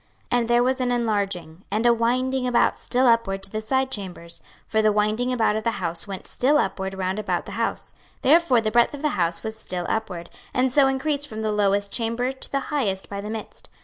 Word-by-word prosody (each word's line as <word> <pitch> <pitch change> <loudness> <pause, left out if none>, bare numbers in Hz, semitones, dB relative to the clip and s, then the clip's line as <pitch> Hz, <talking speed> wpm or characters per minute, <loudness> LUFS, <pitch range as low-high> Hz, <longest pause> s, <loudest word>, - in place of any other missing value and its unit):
26:041:007 245 - +4
And 235 - -1
there 240 0 +4
was 260 +1 +1
an 250 -1 +1
enlarging, 200 -7 -1
and 215 +4 0
a 240 - +6
winding 250 +3 +1
about 245 -1 +2
still 255 +1 +1
upward 220 -5 +2
to 195 - -1
the 215 - -3
side 265 +4 0
chambers: 180 -5 -6 0.2
for 220 - +1
the 215 0 +4
winding 215 +4 +1
about 225 -4 +2
of 220 - -2
the 230 - +2
house 170 0 -3
went 195 -2 -6
still 285 +4 +2
upward 190 -8 -1
round 190 +1 -2
about 215 - -1
the - - -8
house: - - -2 0.3
therefore 280 -4 +5
the 215 -1 -1
breadth 240 +5 +3
of 285 - -10
the 300 - +3
house 170 - -1
was 220 0 -4
still 180 -5 -4
upward, 180 -6 -3 0.2
and 255 0 +2
so 280 -1 +6
increased 285 +2 0
from 220 -2 -6
the 215 - 0
lowest 200 -1 +1
chamber 235 +2 -1
to 265 - -6
the 275 - +1
highest 205 -10 -1
by 200 0 -4
the 210 - -6
midst. 220 -1 -6
220 Hz, 225 wpm, -24 LUFS, 200-255 Hz, 0.3 s, a